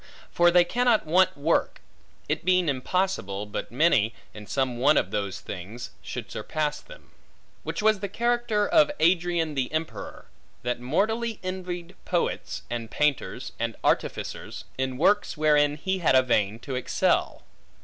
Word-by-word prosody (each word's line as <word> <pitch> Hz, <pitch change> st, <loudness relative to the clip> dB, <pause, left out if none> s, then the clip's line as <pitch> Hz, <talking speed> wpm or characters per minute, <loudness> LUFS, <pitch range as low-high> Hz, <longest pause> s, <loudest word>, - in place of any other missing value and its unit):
For 175 Hz, 0 st, +5 dB
they 175 Hz, 0 st, +6 dB
cannot 240 Hz, +3 st, +2 dB
want 185 Hz, +2 st, +3 dB
work; 155 Hz, +4 st, +1 dB, 0.5 s
it -, -, -1 dB
being 185 Hz, -1 st, +3 dB
impossible, 130 Hz, -, -1 dB
but 105 Hz, -, -5 dB
many, 125 Hz, -5 st, +3 dB, 0.2 s
in 105 Hz, -1 st, -10 dB
some 130 Hz, -3 st, -1 dB
one 145 Hz, +4 st, +5 dB
of -, -, +1 dB
those 100 Hz, -2 st, -2 dB
things, 100 Hz, +6 st, -7 dB
should -, -, -7 dB
surpass 150 Hz, -1 st, -2 dB
them. -, -, -15 dB, 0.5 s
Which -, -, -4 dB
was 215 Hz, -2 st, +4 dB
the 200 Hz, 0 st, -4 dB
character 235 Hz, -1 st, +1 dB
of 305 Hz, -2 st, +5 dB
Adrian 170 Hz, -2 st, +2 dB
the 135 Hz, -3 st, -1 dB
Emperor; 155 Hz, +1 st, -5 dB, 0.4 s
that 125 Hz, 0 st, -1 dB
mortally 215 Hz, -, 0 dB
envied 180 Hz, -1 st, -5 dB
poets, 175 Hz, -2 st, -2 dB
and 115 Hz, -1 st, -4 dB
painters, 140 Hz, -2 st, -1 dB
and 115 Hz, 0 st, -2 dB
artificers, -, -, -2 dB
in 130 Hz, -1 st, -2 dB
works 205 Hz, +4 st, +2 dB
wherein 150 Hz, -1 st, +3 dB
he 190 Hz, +4 st, -2 dB
had 160 Hz, -6 st, +3 dB
a 130 Hz, -, +6 dB
vein 105 Hz, -4 st, +1 dB
to 135 Hz, -, -6 dB
excel. 125 Hz, -, 0 dB
155 Hz, 150 wpm, -26 LUFS, 125-185 Hz, 0.5 s, they